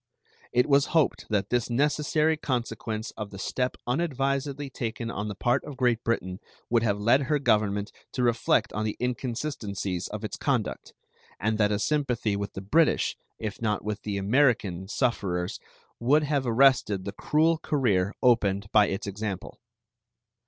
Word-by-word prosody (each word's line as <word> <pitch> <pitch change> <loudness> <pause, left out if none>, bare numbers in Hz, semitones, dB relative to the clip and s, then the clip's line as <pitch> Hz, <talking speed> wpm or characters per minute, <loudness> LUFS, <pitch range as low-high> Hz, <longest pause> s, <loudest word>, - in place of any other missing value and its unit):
It 125 +1 +3
was 140 0 +4
hoped 155 - +1
that 100 -3 0
this 120 -1 +1
necessary 150 +4 +2
consequence 115 -5 -3
of 105 -2 -6
the 95 - -10
step 125 +6 -2
unadvisedly 140 0 -1
taken 115 -1 -4
on 105 -1 -3
the 105 - -4
part 120 +4 +1
of 145 -3 -8
Great 120 -2 +1
Britain 95 -5 -1 0.3
would 120 -1 +4
have 105 -3 0
led 120 +6 +4
her 150 +2 +2
Government 105 -6 +1 0.2
to 125 - -1
reflect 120 -1 +2
on 110 - -1
the 110 -1 -2
inconsistencies 120 - -3
of 105 +1 -6
its 110 - -4
conduct, 130 -7 -2 0.5
and 110 +4 0
that 105 -1 +3
a 105 - +1
sympathy 120 -3 0
with 100 0 -4
the 95 - -6
British, 155 +12 +2 0.2
if 110 -1 -5
not 105 -3 -1
with 105 0 -3
the 105 -2 -3
American, 100 -4 +2
sufferers 95 -7 -1 0.4
would 145 +6 +3
have 145 -3 0
arrested 115 -6 +3
the 100 - -3
cruel 155 +9 +2
career 105 -13 +1
opened 100 -5 +2
by 105 -2 +5
its 95 - -3
example. 100 -1 -5
115 Hz, 160 wpm, -27 LUFS, 105-135 Hz, 0.5 s, by